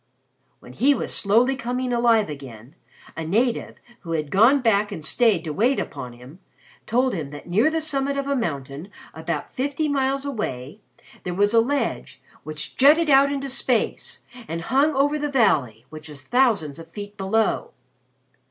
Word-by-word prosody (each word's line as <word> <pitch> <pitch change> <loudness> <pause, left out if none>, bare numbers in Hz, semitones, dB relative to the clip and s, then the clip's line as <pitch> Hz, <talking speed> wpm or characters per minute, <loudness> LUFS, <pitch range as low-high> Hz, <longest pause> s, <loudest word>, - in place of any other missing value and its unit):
"When 125 - -13
he 275 - +3
was - - -2
slowly 235 +6 +3
coming 250 0 -3
alive 235 -2 +3
again, 135 -4 -10 0.4
a 160 - -4
native, 230 +9 0 0.2
who 165 -2 -6
had 155 -3 -3
gone 230 +9 +5
back 210 -4 +1
and 155 - -6
stayed 215 -4 +2
to 155 -3 -4
wait 240 - +1
upon 125 -1 -6
him, 125 +8 -14 0.5
told 250 +3 +1
him 155 -7 -4
that 145 0 -11
near 210 - +3
the 320 0 -2
summit 280 -2 -1
of 275 - -2
a 280 0 0
mountain, 145 - -4 0.2
about 160 -1 -5
fifty 285 +4 -1
miles 275 -1 0
away, 205 - -5 0.4
there 180 -1 -5
was 205 +3 +2
a 230 - +6
ledge 280 +5 -2 0.2
which 155 0 -7
jutted 300 +3 +5
out 275 +1 +5
into 275 -1 -3
space 265 - -1 0.3
and 165 +1 -4
hung 285 +2 +3
over 290 +2 +1
the 295 0 -2
valley, 140 - +1
which 155 0 -10
was 145 -2 -11
thousands 215 - +1
of 165 0 -12
feet 205 +3 -9
below. 210 +3 0
225 Hz, 170 wpm, -23 LUFS, -, 0.5 s, a